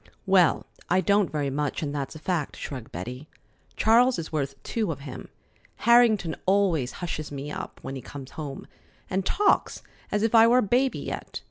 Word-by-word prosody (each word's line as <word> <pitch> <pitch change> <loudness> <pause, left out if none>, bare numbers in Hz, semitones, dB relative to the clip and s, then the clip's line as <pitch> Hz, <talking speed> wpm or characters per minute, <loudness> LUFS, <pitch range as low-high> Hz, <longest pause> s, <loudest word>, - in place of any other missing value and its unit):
"Well, 190 -4 +4 0.2
I 185 - +4
don't 200 +2 +2
very 145 -3 -1
much, 145 +2 -2
and 145 -1 -3
that's 140 +1 -4
a - - -6
fact," 155 -2 -2
shrugged 130 -5 -7
Betty. 125 - -7 0.5
"Charles 240 +3 +4
is 165 - -5
worth 140 -3 -2
two 215 -7 -1
of 140 -3 -7
him. 140 -2 -8 0.5
Harrington 225 -7 +4
always 185 -9 +2
hushes 155 -4 -5
me 140 +1 -5
up - - -6
when 135 +1 -5
he 135 - -6
comes 135 +1 -9
home, 145 -3 -7 0.5
and 190 +1 0
talks 410 - +1 0.3
as 210 0 +1
if 225 - +1
I 225 0 +8
were 240 +2 +5
a 255 - +4
baby 250 +6 +2
yet. - - -5
165 Hz, 180 wpm, -26 LUFS, 140-210 Hz, 0.5 s, I